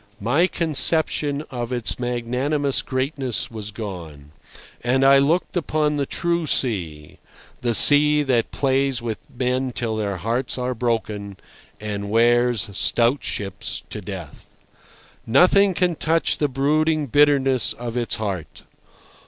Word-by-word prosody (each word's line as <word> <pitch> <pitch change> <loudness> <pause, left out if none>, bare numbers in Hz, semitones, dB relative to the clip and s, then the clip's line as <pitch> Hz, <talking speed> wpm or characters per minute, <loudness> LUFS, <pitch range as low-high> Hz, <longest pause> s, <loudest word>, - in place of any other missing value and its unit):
My 140 - +2
conception 155 -2 +1
of 120 -1 -5
its 120 -1 0
magnanimous 125 +4 -1
greatness 130 -3 -3
was 110 -2 -7
gone. 85 -9 -8 0.5
And 130 +2 +1
I 135 0 +6
looked 160 +8 0
upon 155 -3 0
the 140 -2 -2
true 170 -1 0
sea—the 100 - -4
sea 150 +2 +7
that 125 -5 0
plays 135 -1 0
with 115 -3 -5
men 125 +1 -2
till 115 -2 -3
their 100 -3 -2
hearts 120 +8 -2
are 125 0 -2
broken, 110 -4 -3 0.4
and 100 -1 -5
wears 120 +1 +2
stout 120 +6 +1
ships 95 -2 -4
to - - -5
death. - - -10 0.7
Nothing 185 - +4
can 180 -1 +1
touch 160 +1 0
the 150 - +2
brooding 155 +3 +1
bitterness 135 -2 +3
of 120 -1 -7
its 120 -1 -1
heart. 100 -7 -5
125 Hz, 125 wpm, -22 LUFS, 115-145 Hz, 0.7 s, sea